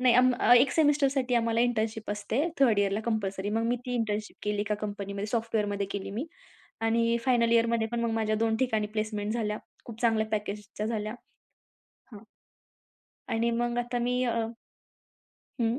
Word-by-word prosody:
नाही. 250 -1 +5
अं, 255 +1 +6 0.3
एक 260 +3 +5
सेमिस्टरसाठी 280 -4 +2
आम्हाला 230 -1 +2
इंटर्नशिप 220 -3 0
असते 210 +6 -1 0.2
3rd 230 -7 +5
इयरला 200 +1 +1
कंपल्सरी. 200 -3 -1
मग 225 +2 0
मी 240 +1 +1
ती 250 - -2
इंटर्नशिप 215 -3 -2
केली 210 0 -1
एका 210 0 0
कंपनीमध्ये 200 -1 -4
सॉफ्टवेअरमध्ये 210 -3 -1
केली 195 -1 -4
मी 230 +10 -3 0.5
आणि 230 +1 +2
फायनल 235 -3 +3
इयरमध्ये 230 -1 +3
पण 235 - 0
मग 235 0 0
माझ्या 220 -1 +1
2 225 0 +1
ठिकाणी 220 -4 0
प्लेसमेंट 215 -1 -1
झाल्या. 215 -2 -1 0.3
खूप 230 -1 -10
चांगल्या 225 -2 +2
पॅकेजच्या 210 0 -3
झाल्या. 215 -1 -2 1.0
हां. 210 - -9 1.1
आणि 230 +1 +1
मग 240 0 -1
आता 240 0 -1
मी 250 +1 +1
अ 240 - +1 1.3
हं, 230 +2 +1
225 Hz, 155 wpm, -28 LUFS, 210-240 Hz, 1.3 s, अं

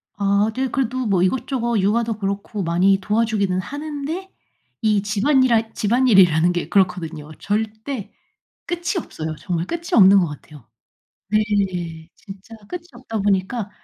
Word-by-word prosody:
아 200 +2 +2
네. 265 +1 0
그래도 255 0 -1
뭐 195 -5 +2
이것저것 235 +2 0
육아도 220 +3 +1
그렇고 200 0 -3
많이 180 +3 +3
도와주기는 210 -3 0
하는데, 300 - -5 0.5
이 215 -2 +2
집안이라 225 +2 +2
집안일이라는 195 -8 +4
게 175 - -3
그렇거든요. 170 -5 0
절대 220 +3 -3 0.5
끝이 350 +3 -2
없어요. 160 - -5
정말 170 0 -2
끝이 340 - -5
없는 195 -2 +7
것 175 - +1
같아요. 150 -4 -12 0.6
네. 190 -6 -1
진짜 200 +3 -12
끝이 355 +5 -6
없다 240 -3 -5
보니까 200 +2 0
205 Hz, 305 characters per minute, -21 LUFS, 185-240 Hz, 0.6 s, 없는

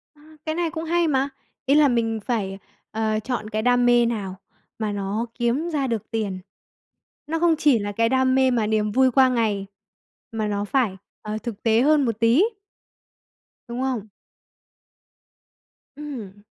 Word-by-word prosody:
A, 295 - -22 0.2
cái 315 0 -2
này 345 -1 0
cũng 320 -1 -4
hay 335 0 +1
mà. 275 -1 +1 0.4
Ý 275 - +3
là 300 -1 +6
mình 225 -3 0
phải, 200 -5 -2 0.3
ờ, 220 0 0
chọn 220 -1 -4
cái 215 0 -1
đam 245 +1 +3
mê 240 -1 +5
nào 200 -5 -3 0.4
mà 215 -1 -1
nó 205 +3 -2
kiếm 250 +8 0
ra 285 -5 -1
được 230 -4 -3
tiền, 205 -4 -2 0.9
nó 325 +1 -1
không 335 -1 +4
chỉ 280 -8 +4
là 205 0 -3
cái 230 +2 +1
đam 260 0 +2
mê 260 -1 +4
mà 225 -3 +1
niềm 215 -1 +1
vui 260 +2 +4
qua 260 +1 +5
ngày, 215 -5 0 0.7
mà 220 -1 -2
nó 205 0 -2
phải, 220 -5 0 0.2
ờ, 215 0 -4
thực 225 -4 -6
tế 225 0 +4
hơn 295 -1 +4
một 225 -2 -2
tí. 235 - +4 1.2
Đúng 240 +2 -4
không? 250 -6 -2 1.9
Ừm. 225 -10 -8
235 Hz, 165 wpm, -23 LUFS, 215-265 Hz, 1.9 s, là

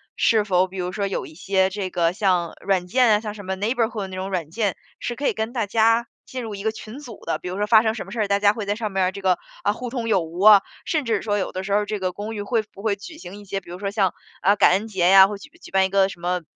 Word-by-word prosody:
是 220 -3 +3
否 185 -2 +2
比 190 - -13
如 180 0 -2
说 200 0 -2
有 195 - -3
一 155 - -14
些 190 +1 +1
这 190 -1 -4
个 170 -1 +2
像 180 -4 0
软 185 -2 +1
件， 250 +4 +3
啊， 210 - +4
像 215 -1 -6
什 205 -2 -10
么 190 0 -2
Neighborhood 225 +2 -1
的 195 - -4
那 190 - -8
种 190 +1 -4
软 170 -5 -2
件 205 +1 -1 0.2
是 240 - -4
可 285 - -1
以 - - +2
跟 220 +2 -3
大 230 -5 -1
家 230 +2 +3 0.2
进 255 -1 -6
入 220 -3 -5
一 195 - -7
个 220 - +1
群 220 +3 -10
组 245 -7 -10
的。 - - -1
比 - - -9
如 185 +2 -4
说 210 0 0
发 220 0 +6
生 220 0 +1
什 225 - -6
么 - - -10
事 235 - -5
儿， 205 - +1
大 200 0 +2
家 205 0 +4
会 215 -2 -5
在 205 +1 -1
上 215 -2 -3
面 190 -1 +1
这 200 - -7
个， 185 -2 +2 0.2
啊， 205 - +2
互 240 +2 -6
通 235 -3 -3
有 190 - +3
无 165 +2 -7
啊。 205 -2 +8 0.2
甚 305 -5 -1
至 220 -3 0
说 205 -1 0
有 190 - -2
的 185 +1 -4
时 200 - -5
候 205 +1 +2
这 210 -1 -3
个 185 -1 -1
公 210 +4 -6
寓 205 - -4
会 220 +2 0
不 205 -2 -15
会 210 -2 +1
举 315 - -11
行 195 +4 -9
一 205 - -13
些， 195 0 -4
比 170 - -17
如 175 - -7
说 200 0 -3
像， 195 -4 +1 0.3
啊， 200 +3 +4
感 - - +5
恩 200 +4 +1
节 190 -5 0
啊， 190 0 +9
会 205 0 -5
举 195 - -13
举 - - -12
办 190 0 +3
一 - - -2
个 195 0 +3
什 175 - -10
么 180 0 -1
200 Hz, 380 characters per minute, -23 LUFS, 190-220 Hz, 0.3 s, 啊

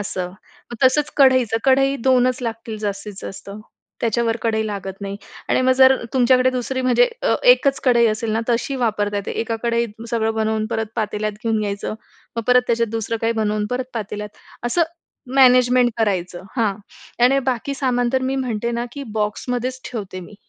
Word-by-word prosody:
असं. 185 -3 -3 0.4
मग 240 +2 -1
तसंच 295 +4 +3
कढईचं, 255 -5 +4
कढई 270 +1 +3
2च 255 -1 +2
लागतील 225 -1 -5
जास्तीत 205 0 -4
जास्त, 195 +1 -8 0.5
त्याच्या 235 0 +1
वर 225 0 0
कढई 220 -1 +1
लागत 195 -2 -4
नाही. 200 0 -5 0.3
आणि - - +2
मग 260 - +4
जर 260 0 +6 0.2
तुमच्याकडे 255 0 +4
दुसरी 255 +1 -2
म्हणजे 255 - +4
अ, - - +2 0.2
एकच 275 - +3
कढई 235 -3 +4
असेल 220 +1 -1
ना 220 - +1
तशी 245 +3 0
वापरता 210 -4 0
येते 200 - -3
एका 225 0 -2
कढईत 235 -2 -1
सगळं 225 -1 0
बनवून 220 0 0
परत 225 -1 -1
पातेल्यात 215 -1 -2
घेऊन 225 -1 +1
घ्यायचं. 205 0 -3 0.4
मग 230 - -1
परत 250 0 +5
त्याच्यात 230 -1 +1
दुसरं 225 0 -2
काही 230 0 +1
बनवून 215 -2 -1
परत 250 +1 -1
पातेल्यात 210 -1 -5 0.3
असं 335 +8 +2 0.5
मॅनेजमेंट 250 -1 +5
करायचं. 185 -5 -1
हां 215 -4 +1 0.5
आणि 270 +2 +4
बाकी 260 +2 -1
सामान 245 -3 0
तर 260 - +1
मी 265 +1 -1
म्हणते 235 -3 -2
ना, 235 0 -2
की 285 - -6
बॉक्समध्येच 245 +4 -2
ठेवते 200 -6 -6
मी. 185 +4 -12
230 Hz, 175 wpm, -21 LUFS, 215-255 Hz, 0.5 s, जर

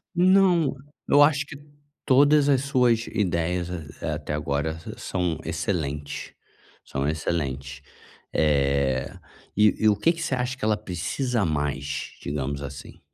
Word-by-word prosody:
Não, 180 -4 +4 0.3
eu 145 - +6
acho 145 -1 +4
que 145 - -10 0.5
todas 145 +2 +5
as 135 -2 +4
suas 125 -4 +2
ideias 90 -4 -1 0.3
a 80 -2 -1
até 75 0 -5
agora 75 +1 -1 0.2
são 90 -3 -2
excelentes, 75 -5 -3 0.5
são 70 +1 -3
excelentes, 70 -3 -3 0.5
eh, 70 -3 +1 0.4
e 105 0 +4
e - - +6
o 105 - +3
quê 135 +11 +3
que 165 -1 -6
você 155 - -1
acha 125 +1 -2
que 130 - -3
ela 110 -1 +2
precisa 105 +5 -2
mais? 70 -2 -2
Digamos 70 0 -3
assim. 70 -1 -9
90 Hz, 130 wpm, -25 LUFS, -, 0.5 s, eu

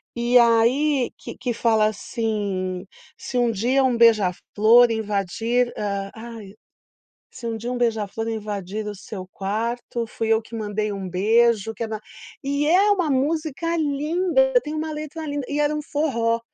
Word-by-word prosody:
E 240 +1 +3
aí 245 +4 +3
que - - -9
que 245 -1 -2
fala 225 -2 +2
assim: 200 -4 -3 0.3
"Se 250 - -5
um 240 -1 +3
dia 245 +6 +1
um 255 -2 +2
beija-flor 225 +2 +4
invadir, 220 +3 0
hã, 200 -1 -3
ai, 225 -3 -9 0.8
se 235 - -9
um 225 -1 -2
dia 235 +3 -5
um 250 - -3
beija-flor 225 -2 -1
invadir 210 -2 -4
o - - -3
seu 190 -1 -8
quarto 230 +4 -3
fui 225 0 -3
eu 220 0 +2
que 230 +1 -9
mandei 210 -1 -2
um 195 -2 -5
beijo 225 +3 +2
que 230 - -4
era." 220 -1 -5 0.4
E 285 +1 0
é 380 +6 +4
uma 370 -6 +2
música 310 +4 0
linda, 335 - +1
tem 300 +1 -4
uma 315 +1 -3
letra 305 +1 -6
linda, 285 -2 -3
e 290 +1 -1
era 295 0 +2
um 300 - -2
forró. 235 -7 0
230 Hz, 160 wpm, -23 LUFS, 215-280 Hz, 0.8 s, beija-flor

